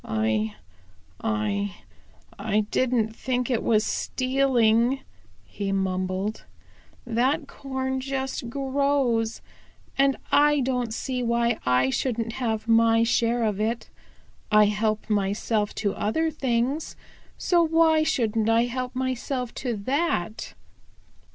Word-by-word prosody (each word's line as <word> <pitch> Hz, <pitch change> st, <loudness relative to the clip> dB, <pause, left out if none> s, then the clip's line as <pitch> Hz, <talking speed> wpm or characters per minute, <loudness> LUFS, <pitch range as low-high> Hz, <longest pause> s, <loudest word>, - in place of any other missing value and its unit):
"I 110 Hz, -1 st, -1 dB, 0.7 s
I 205 Hz, -2 st, -1 dB, 0.6 s
I 215 Hz, -1 st, +1 dB
don't 235 Hz, -4 st, +1 dB
think 250 Hz, +1 st, -2 dB
it 235 Hz, -, +1 dB
was 215 Hz, -1 st, +2 dB
stealing," 255 Hz, -1 st, +2 dB, 0.4 s
he 200 Hz, -1 st, -4 dB
mumbled. 190 Hz, +2 st, -2 dB, 0.6 s
"That 260 Hz, +6 st, 0 dB
corn 265 Hz, -1 st, -3 dB
just 265 Hz, -2 st, -3 dB
grows, 270 Hz, -4 st, 0 dB, 0.6 s
and 275 Hz, -1 st, +4 dB
I 295 Hz, 0 st, +5 dB
don't 250 Hz, -3 st, -1 dB
see 250 Hz, +2 st, -3 dB
why 235 Hz, -1 st, +1 dB
I 125 Hz, +1 st, +3 dB
shouldn't 230 Hz, -, -1 dB
have 220 Hz, -3 st, -2 dB
my 225 Hz, 0 st, +4 dB
share 235 Hz, +1 st, +1 dB
of 210 Hz, -2 st, 0 dB
it. 225 Hz, +2 st, -2 dB, 0.6 s
I 210 Hz, 0 st, +7 dB
help 215 Hz, +1 st, 0 dB
myself 205 Hz, +1 st, 0 dB
to 205 Hz, -2 st, -1 dB
other 320 Hz, +11 st, 0 dB
things, 265 Hz, +1 st, -1 dB, 0.4 s
so 350 Hz, -2 st, +3 dB
why 325 Hz, -1 st, +4 dB
shouldn't 225 Hz, -7 st, +1 dB
I 225 Hz, +1 st, +4 dB
help 250 Hz, +1 st, -4 dB
myself 255 Hz, -1 st, -2 dB
to 245 Hz, -3 st, -1 dB
that?" 225 Hz, -, -2 dB
235 Hz, 110 wpm, -25 LUFS, 215-265 Hz, 0.7 s, I